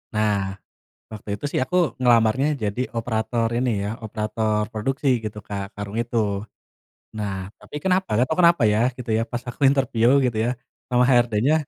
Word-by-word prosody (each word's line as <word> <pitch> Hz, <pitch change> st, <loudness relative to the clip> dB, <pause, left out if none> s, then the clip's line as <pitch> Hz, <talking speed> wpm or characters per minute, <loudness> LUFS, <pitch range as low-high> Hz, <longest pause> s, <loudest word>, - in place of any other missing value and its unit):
Nah, 105 Hz, -1 st, +2 dB, 0.8 s
waktu 105 Hz, -1 st, -10 dB
itu -, -, -13 dB
sih -, -, +1 dB
aku 180 Hz, -, -2 dB, 0.3 s
ngelamarnya 120 Hz, +2 st, +4 dB, 0.2 s
jadi 105 Hz, +3 st, -2 dB, 0.2 s
operator 115 Hz, 0 st, -1 dB
ini 125 Hz, 0 st, +1 dB
ya, -, -, -2 dB, 0.2 s
operator 110 Hz, 0 st, -1 dB
produksi 135 Hz, +7 st, -1 dB, 0.2 s
gitu, 105 Hz, 0 st, -5 dB
Kak, 100 Hz, -1 st, -3 dB
karung 105 Hz, +1 st, -6 dB
itu. 120 Hz, 0 st, -6 dB, 1.0 s
Nah, 105 Hz, -2 st, -2 dB, 0.3 s
tapi -, -, -12 dB
kenapa 190 Hz, 0 st, +2 dB
gak 125 Hz, -, +3 dB
tahu 160 Hz, -, 0 dB
kenapa 170 Hz, -6 st, +5 dB
ya, 105 Hz, -, +2 dB, 0.2 s
gitu 125 Hz, -2 st, -7 dB
ya, -, -, +1 dB
pas 120 Hz, -1 st, -3 dB
aku 120 Hz, -, -10 dB
interview 130 Hz, -4 st, +2 dB, 0.2 s
gitu 120 Hz, -3 st, -1 dB
ya, -, -, +1 dB, 0.4 s
sama 125 Hz, 0 st, +3 dB
HRD-nya, 120 Hz, +2 st, +3 dB
115 Hz, 165 wpm, -23 LUFS, 105-130 Hz, 1.0 s, kenapa